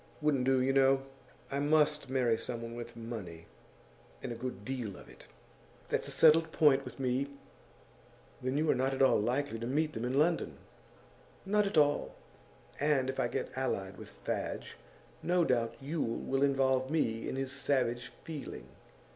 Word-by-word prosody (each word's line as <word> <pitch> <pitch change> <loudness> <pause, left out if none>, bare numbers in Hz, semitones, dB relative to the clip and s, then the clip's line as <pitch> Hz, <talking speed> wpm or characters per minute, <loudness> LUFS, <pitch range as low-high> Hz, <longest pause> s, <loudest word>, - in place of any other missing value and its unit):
Wouldn't 145 -4 +1
do, 135 0 +4
you 135 +1 +2
know. 135 0 +4 0.5
I 140 - -1
must 150 -1 +2
marry 125 -3 +2
someone 115 0 -5
with 120 0 -7
money, 105 -8 -7 0.8
and - - -4
a - - -4
good 115 -4 -6
deal 120 -7 -4
of - - -13
it. - - -15 0.6
That's - - 0
a - - +1
settled 160 0 +6
point 145 -4 +4
with - - -9
me.' 130 +1 0 1.1
'Then 130 +2 -1
you 155 +1 +1
are - - +4
not 130 +1 0
at 135 - +3
all 135 - +5
likely 120 +2 -1
to 115 - -4
meet 155 +4 0
them 110 - -4
in 125 +2 -1
London?' 165 +3 +1 0.9
'Not 210 +1 +2
at 195 - -2
all. 145 -1 +3 0.6
And 140 -3 +2
if 135 - -8
I - - +2
get - - -4
allied 100 -8 -2
with - - -10
Fadge, - - -4 0.5
no 175 0 +2
doubt 120 -4 +1
Yule 140 -4 -2
will 135 0 -1
involve 135 -2 +2
me 115 -8 0
in - - -3
his 135 0 -3
savage 130 -4 0 0.2
feeling. 155 -3 -7
135 Hz, 170 wpm, -32 LUFS, 120-145 Hz, 1.1 s, settled